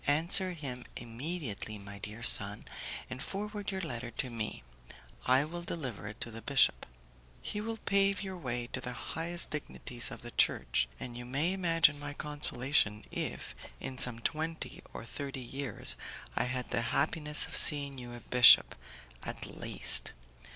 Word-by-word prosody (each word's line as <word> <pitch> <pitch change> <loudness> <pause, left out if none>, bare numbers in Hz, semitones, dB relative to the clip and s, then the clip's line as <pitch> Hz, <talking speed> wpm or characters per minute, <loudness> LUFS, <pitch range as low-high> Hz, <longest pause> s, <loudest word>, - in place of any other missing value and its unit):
Answer 170 +5 +4
him 135 -6 -6
immediately, 120 - -5
my 100 0 -11
dear 105 +3 -8
son, - - +5 0.4
and 130 0 -7
forward 205 +4 -5
your 190 -2 -3
letter 125 -7 -4
to 125 +2 -4
me; 110 - -5 0.6
I 130 +3 +4
will 175 +3 -6
deliver 135 -12 -5
it 105 +2 -9
to 120 - -3
the 115 +1 -8
bishop. 140 +1 +2 0.5
He 210 - -4
will 225 +1 -4
pave 200 -1 +1
your 190 -1 -5
way 125 -8 -4
to - - -3
the 125 - -6
highest 170 +6 0
dignities 125 -5 -2
of 115 -2 -10
the 120 - -8
Church, - - +1
and 120 -1 -7
you 120 - -7
may 140 +9 -1
imagine 165 -5 +3
my 145 0 -6
consolation 140 -7 +3
if, - - -5 0.3
in 130 -1 -6
some 120 -2 +4
twenty 160 +6 -4
or - - -8
thirty 135 +2 -6
years, 135 +2 0 0.4
I - - +1
had 125 0 -4
the 115 - +1 0.2
happiness 150 +1 +4
of - - -6
seeing 140 -2 +4
you 120 -1 -9
a 120 - -10
bishop, 125 0 +7 0.5
at - - -4
least! - - +1
140 Hz, 160 wpm, -31 LUFS, 120-165 Hz, 0.6 s, bishop